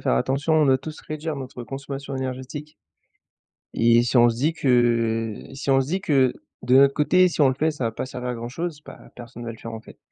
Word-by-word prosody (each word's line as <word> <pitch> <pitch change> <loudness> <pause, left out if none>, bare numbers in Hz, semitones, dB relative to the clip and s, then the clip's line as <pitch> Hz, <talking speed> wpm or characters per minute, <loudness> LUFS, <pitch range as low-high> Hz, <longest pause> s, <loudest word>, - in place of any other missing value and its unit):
faire - - +1
attention, 135 - 0
on 155 -2 +4
doit 130 -1 +4
tous 155 +3 -9
réduire 155 0 -5
notre 130 -2 -7
consommation 135 +2 -6
énergétique 130 +3 -6 1.0
et 115 +1 +4
si 125 +1 0
on 120 0 +7
se 115 - -1
dit 150 +6 +1
que 115 -5 +1 0.2
si 140 0 -3
on 135 0 +5
se 130 - -2
dit 185 +5 -1
que, 135 -9 +2 0.3
de 125 +2 +4
notre 140 0 +6
côté, 180 +5 +4
si 165 - -4
on 140 - +6
le 130 - +1
fait 155 +4 +1
ça 145 -5 -4
va 115 - -1
pas 130 - -5
servir 125 -1 -6
à - - -3
grand 120 +1 -6
chose, 160 +2 -5
bah, - - -13
personne 120 -1 -10
va 115 - -4
le 110 - -14
faire, 115 - -8
en 110 - -6
fait - - -16
130 Hz, 245 wpm, -23 LUFS, 120-150 Hz, 1.0 s, on